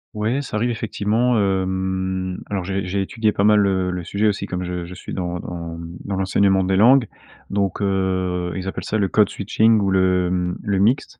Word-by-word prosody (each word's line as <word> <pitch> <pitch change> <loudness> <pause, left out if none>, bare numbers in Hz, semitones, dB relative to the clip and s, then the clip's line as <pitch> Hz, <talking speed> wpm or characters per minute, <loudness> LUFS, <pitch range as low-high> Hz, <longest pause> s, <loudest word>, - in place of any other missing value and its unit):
Ouais, 110 +6 0
ça 135 - -4
arrive 120 +3 0
effectivement, 115 +2 0
hem, 95 -1 -1
alors 100 -2 -2
j'ai 95 +1 -2
j'ai 95 +1 -1
étudié 110 +2 0
pas 100 - -1
mal, 105 0 +5
heu, 95 -1 0
le 90 -1 -4
sujet 100 +5 0
aussi 100 -1 -1
comme 90 -1 -3
je 90 -1 -4
je 90 - -9
suis - - -8
dans 90 -1 -3
dans, 85 -1 -6
mmh, 85 +1 -8
dans 100 - -2
l'enseignement 95 0 +2
des 95 +1 +1
langues 125 +5 +6 0.5
donc 100 -1 -1
heu, 95 -3 -1
ils 95 0 -4
appellent 95 - -4
ça 110 - -1
le 100 -2 +1
code-switching 105 +2 +2
ou 100 -1 +1
le, 90 -1 +2
mmh, 90 -1 -1
le 100 -3 0
mixte, 120 +4 +1
95 Hz, 205 wpm, -21 LUFS, 90-105 Hz, 0.5 s, langues